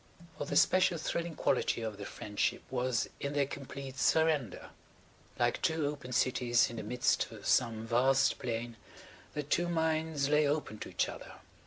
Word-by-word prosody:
For -, -, -2 dB
the -, -, -3 dB
special 185 Hz, -2 st, +4 dB
thrilling 165 Hz, +1 st, -3 dB
quality 115 Hz, -, +1 dB
of 110 Hz, -2 st, -4 dB
their 100 Hz, -1 st, -6 dB
friendship 105 Hz, -1 st, -2 dB
was 125 Hz, -2 st, 0 dB
in 140 Hz, 0 st, -3 dB
their 145 Hz, -1 st, +2 dB
complete 135 Hz, -1 st, -7 dB
surrender. 150 Hz, -, +1 dB, 0.7 s
Like -, -, +1 dB
two 160 Hz, -2 st, +1 dB
open 145 Hz, -3 st, -4 dB
cities 120 Hz, -1 st, +2 dB
in 115 Hz, -, -7 dB
the -, -, -3 dB
midst 125 Hz, +3 st, 0 dB
of 105 Hz, -3 st, -11 dB
some 115 Hz, -3 st, +2 dB
vast 130 Hz, +4 st, +3 dB
plain 115 Hz, 0 st, -4 dB, 0.6 s
their 150 Hz, -, -1 dB
two 175 Hz, +5 st, 0 dB
minds 160 Hz, -3 st, 0 dB
lay 150 Hz, 0 st, +3 dB
open 145 Hz, -7 st, -2 dB
to -, -, -6 dB
each -, -, 0 dB
other. -, -, -9 dB
135 Hz, 165 wpm, -32 LUFS, 120-150 Hz, 0.7 s, special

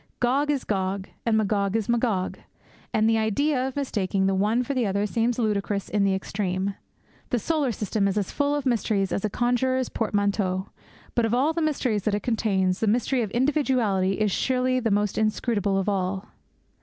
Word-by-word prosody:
Gog 270 Hz, +4 st, +1 dB
is 280 Hz, -3 st, 0 dB
Gog, 190 Hz, -1 st, -2 dB, 0.2 s
and 220 Hz, -1 st, +3 dB
Magog 200 Hz, -1 st, +1 dB
is 225 Hz, -3 st, 0 dB
Magog; 230 Hz, -6 st, 0 dB, 0.5 s
and 220 Hz, 0 st, +2 dB
the 225 Hz, 0 st, +3 dB
idea 255 Hz, +5 st, +1 dB
of 265 Hz, -, -6 dB
mistaking 205 Hz, -8 st, 0 dB
the 195 Hz, -, +2 dB
one 210 Hz, +6 st, +2 dB
for 280 Hz, -, -3 dB
the 250 Hz, -5 st, +1 dB
other 200 Hz, +1 st, 0 dB
seems 230 Hz, +3 st, 0 dB
ludicrous 205 Hz, -3 st, -1 dB
in 205 Hz, -1 st, +1 dB
the 195 Hz, -1 st, +2 dB
extreme. 190 Hz, 0 st, -2 dB, 0.6 s
The 245 Hz, -, +1 dB
solar 290 Hz, +2 st, 0 dB
system 210 Hz, -1 st, -1 dB
is 200 Hz, +1 st, -1 dB
as 200 Hz, -3 st, -1 dB
full 285 Hz, 0 st, +1 dB
of 290 Hz, -2 st, -3 dB
mysteries 215 Hz, -5 st, +1 dB
as -, -, -1 dB
a -, -, 0 dB
conjurer's 250 Hz, +3 st, 0 dB
portmanteaux; 200 Hz, -3 st, -1 dB, 0.4 s
but, 235 Hz, -, +2 dB
of 225 Hz, +1 st, +1 dB
all 285 Hz, +6 st, +2 dB
the 335 Hz, -, -1 dB
mysteries 260 Hz, -9 st, 0 dB
that 210 Hz, -2 st, +2 dB
it 205 Hz, -, -3 dB
contains, 195 Hz, -5 st, +1 dB
the 220 Hz, -, 0 dB
mystery 245 Hz, +4 st, +1 dB
of 215 Hz, -, -2 dB
individuality 245 Hz, -8 st, +2 dB
is 210 Hz, 0 st, 0 dB
surely 255 Hz, +3 st, +1 dB
the 230 Hz, -2 st, 0 dB
most 205 Hz, 0 st, +1 dB
inscrutable 215 Hz, -2 st, 0 dB
of 195 Hz, -, -1 dB
all. 190 Hz, 0 st, -1 dB
215 Hz, 190 wpm, -25 LUFS, 200-250 Hz, 0.6 s, and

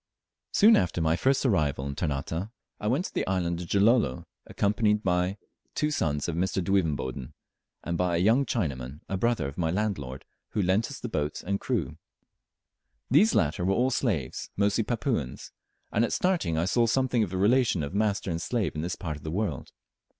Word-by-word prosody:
Soon 220 Hz, +2 st, +6 dB
after 90 Hz, -1 st, 0 dB
my 80 Hz, 0 st, +2 dB
first 135 Hz, +8 st, +1 dB
arrival 75 Hz, -, +1 dB
in 70 Hz, -, -3 dB
Ternate 80 Hz, +5 st, -3 dB, 0.3 s
I 105 Hz, -, -3 dB
went 135 Hz, -, +1 dB
to -, -, -7 dB
the -, -, -1 dB
island 90 Hz, -2 st, -1 dB
of 90 Hz, -, -7 dB
Gilolo, 100 Hz, -, +2 dB, 0.2 s
accompanied 105 Hz, +1 st, +1 dB
by 90 Hz, +2 st, +1 dB, 0.4 s
two 150 Hz, 0 st, 0 dB
sons 75 Hz, -, -1 dB
of 85 Hz, -, -2 dB
Mr. 95 Hz, +3 st, 0 dB
Duivenboden, 75 Hz, -9 st, -1 dB, 0.5 s
and 85 Hz, 0 st, -3 dB
by 90 Hz, -1 st, +1 dB
a -, -, +1 dB
young 115 Hz, +9 st, +4 dB
Chinaman, 75 Hz, -, -3 dB
a 95 Hz, -, -2 dB
brother 115 Hz, -, +1 dB
of 70 Hz, -, -8 dB
my 80 Hz, -2 st, +1 dB
landlord, 80 Hz, -9 st, -2 dB, 0.3 s
who 105 Hz, -, +1 dB
lent 95 Hz, +5 st, +1 dB
us 140 Hz, -, -8 dB
the -, -, -5 dB
boat 75 Hz, -8 st, -3 dB
and 100 Hz, +1 st, -1 dB
crew. -, -, -2 dB, 1.1 s
These 205 Hz, -, +5 dB
latter 80 Hz, +3 st, +1 dB
were 95 Hz, +2 st, +2 dB
all 130 Hz, +4 st, +2 dB
slaves, 95 Hz, -, -1 dB
mostly 100 Hz, +2 st, +2 dB
Papuans, 115 Hz, -, -2 dB, 0.4 s
and 110 Hz, -, +2 dB
at 115 Hz, -, 0 dB
starting 175 Hz, -, +1 dB
I 80 Hz, -, +1 dB
saw 115 Hz, +5 st, +2 dB
something 125 Hz, 0 st, +2 dB
of 105 Hz, -, 0 dB
the 95 Hz, -, -4 dB
relation 105 Hz, -, +3 dB
of 70 Hz, -, -5 dB
master 100 Hz, -2 st, 0 dB
and 85 Hz, 0 st, -2 dB
slave 115 Hz, -1 st, -1 dB
in 75 Hz, -, -3 dB
this 85 Hz, +2 st, -3 dB
part 80 Hz, -5 st, -5 dB
of 75 Hz, -, -14 dB
the 80 Hz, -, -4 dB
world. 85 Hz, -, -3 dB
95 Hz, 190 wpm, -27 LUFS, 80-115 Hz, 1.1 s, Soon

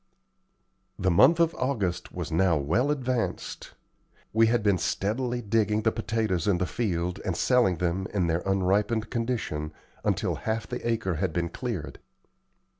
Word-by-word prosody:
The 95 Hz, -1 st, +1 dB
month 165 Hz, -, +6 dB
of 170 Hz, -1 st, +3 dB
August 105 Hz, -10 st, -1 dB
was 85 Hz, -2 st, -5 dB
now 85 Hz, 0 st, +3 dB
well 85 Hz, -, +1 dB
advanced. 130 Hz, -5 st, -2 dB, 0.6 s
We 115 Hz, +1 st, +5 dB
had 115 Hz, -1 st, +1 dB
been 100 Hz, -3 st, +3 dB
steadily 120 Hz, +8 st, -1 dB
digging 105 Hz, 0 st, +1 dB
the 110 Hz, -, +3 dB
potatoes 110 Hz, -6 st, -1 dB
in 100 Hz, -3 st, +3 dB
the 90 Hz, -, 0 dB
field 90 Hz, -5 st, -2 dB
and 90 Hz, -3 st, -2 dB
selling 120 Hz, -9 st, +3 dB
them 90 Hz, +3 st, -1 dB
in 100 Hz, -4 st, +1 dB
their 85 Hz, +1 st, 0 dB
unripened 100 Hz, +4 st, +1 dB
condition, 115 Hz, -11 st, -2 dB, 0.3 s
until -, -, 0 dB
half 110 Hz, 0 st, -2 dB
the 125 Hz, -, -5 dB
acre 110 Hz, -7 st, -1 dB
had 95 Hz, +3 st, -1 dB
been 85 Hz, -1 st, -1 dB
cleared. 115 Hz, -, -5 dB
105 Hz, 150 wpm, -27 LUFS, 90-115 Hz, 0.6 s, month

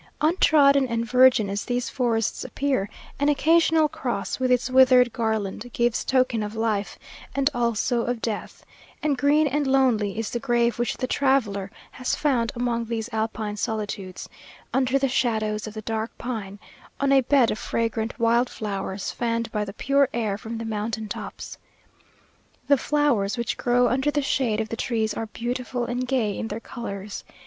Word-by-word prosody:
Untrodden 290 Hz, -4 st, +4 dB
and 230 Hz, -1 st, -1 dB
virgin 250 Hz, -3 st, +5 dB
as 200 Hz, +1 st, -3 dB
these 245 Hz, 0 st, -2 dB
forests 230 Hz, -4 st, -1 dB
appear, 265 Hz, -9 st, -1 dB, 0.3 s
an 285 Hz, +1 st, +3 dB
occasional 320 Hz, +1 st, +4 dB
cross, 255 Hz, -4 st, -3 dB
with 255 Hz, 0 st, +1 dB
its 250 Hz, -1 st, +2 dB
withered 255 Hz, -2 st, +5 dB
garland, 220 Hz, 0 st, -2 dB
gives 240 Hz, -1 st, +1 dB
token 255 Hz, -4 st, +1 dB
of 210 Hz, +1 st, -4 dB
life, 220 Hz, -2 st, -1 dB, 0.4 s
and 275 Hz, +1 st, +2 dB
also 235 Hz, 0 st, 0 dB
of 245 Hz, 0 st, -2 dB
death; 220 Hz, -2 st, -5 dB, 0.4 s
and 300 Hz, -2 st, +2 dB
green 290 Hz, +4 st, +3 dB
and 290 Hz, 0 st, 0 dB
lonely 245 Hz, -7 st, +2 dB
is 225 Hz, -1 st, -3 dB
the 240 Hz, -, -2 dB
grave 235 Hz, -2 st, +1 dB
which 240 Hz, -, -1 dB
the 255 Hz, -, -1 dB
traveller 245 Hz, -8 st, +1 dB, 0.2 s
has 255 Hz, -1 st, -2 dB
found 245 Hz, -6 st, +1 dB
among 235 Hz, -1 st, -1 dB
these 225 Hz, 0 st, -3 dB
Alpine 220 Hz, -1 st, -2 dB
solitudes, 205 Hz, -3 st, -4 dB, 0.5 s
under 260 Hz, 0 st, +2 dB
the 275 Hz, 0 st, +1 dB
shadows 220 Hz, -4 st, 0 dB
of 215 Hz, -, -9 dB
the 215 Hz, -, -6 dB
dark 220 Hz, +1 st, -2 dB
pine, 215 Hz, -5 st, -5 dB, 0.4 s
on 275 Hz, 0 st, +2 dB
a 270 Hz, -1 st, +6 dB
bed 260 Hz, -1 st, +3 dB
of 215 Hz, -, -3 dB
fragrant 225 Hz, 0 st, -2 dB
wild 235 Hz, +2 st, +3 dB
flowers, 195 Hz, -2 st, -4 dB
fanned 230 Hz, -1 st, -2 dB
by 210 Hz, -2 st, -1 dB
the 200 Hz, -, -6 dB
pure 275 Hz, +4 st, +2 dB
air 220 Hz, -4 st, 0 dB
from 225 Hz, +2 st, -6 dB
the 230 Hz, -, -5 dB
mountain 220 Hz, 0 st, -3 dB
tops. -, -, -7 dB, 1.1 s
The 280 Hz, -, +6 dB
flowers 260 Hz, -8 st, +1 dB
which 235 Hz, -1 st, -2 dB
grow 245 Hz, 0 st, +2 dB
under 265 Hz, +4 st, +1 dB
the 290 Hz, -1 st, 0 dB
shade 240 Hz, -6 st, 0 dB
of 220 Hz, -1 st, -2 dB
the -, -, -3 dB
trees 220 Hz, -2 st, -1 dB
are 225 Hz, -, -4 dB
beautiful 245 Hz, +2 st, -3 dB
and 250 Hz, +1 st, -3 dB
gay 235 Hz, -6 st, 0 dB
in 225 Hz, -, -3 dB
their 215 Hz, +1 st, -4 dB
colours. 205 Hz, -4 st, -7 dB
235 Hz, 170 wpm, -24 LUFS, 220-260 Hz, 1.1 s, a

